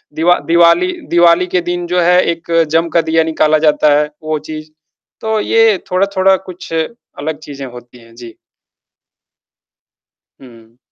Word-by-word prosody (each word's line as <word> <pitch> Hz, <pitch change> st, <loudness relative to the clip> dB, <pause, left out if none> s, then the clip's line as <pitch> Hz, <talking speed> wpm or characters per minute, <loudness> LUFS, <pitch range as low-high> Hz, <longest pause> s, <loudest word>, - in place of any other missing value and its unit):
दिवा 175 Hz, +2 st, +3 dB
दिवाली 170 Hz, -, +4 dB, 0.2 s
दिवाली 175 Hz, +1 st, +3 dB
के 180 Hz, 0 st, 0 dB
दिन 175 Hz, 0 st, -4 dB
जो 180 Hz, +1 st, 0 dB
है 180 Hz, +1 st, +4 dB
एक 170 Hz, 0 st, -8 dB, 0.2 s
जम 165 Hz, +1 st, +2 dB
का -, -, +4 dB
दिया 160 Hz, 0 st, +3 dB
निकाला 155 Hz, -1 st, +1 dB
जाता 150 Hz, 0 st, +3 dB
है 150 Hz, 0 st, -1 dB
वो 155 Hz, 0 st, -2 dB
चीज़। 155 Hz, 0 st, -7 dB, 0.5 s
तो 220 Hz, -1 st, -1 dB
ये 225 Hz, -3 st, +3 dB
थोड़ा-थोड़ा 190 Hz, 0 st, +2 dB
कुछ 175 Hz, -2 st, -10 dB
अलग 160 Hz, -3 st, -5 dB
चीज़ें 140 Hz, -3 st, -9 dB
होती 120 Hz, 0 st, -13 dB
हैं, 115 Hz, 0 st, -19 dB
जी। 120 Hz, -2 st, -11 dB, 2.1 s
हुँ। 115 Hz, -2 st, -17 dB
165 Hz, 145 wpm, -14 LUFS, 150-180 Hz, 2.1 s, दिवाली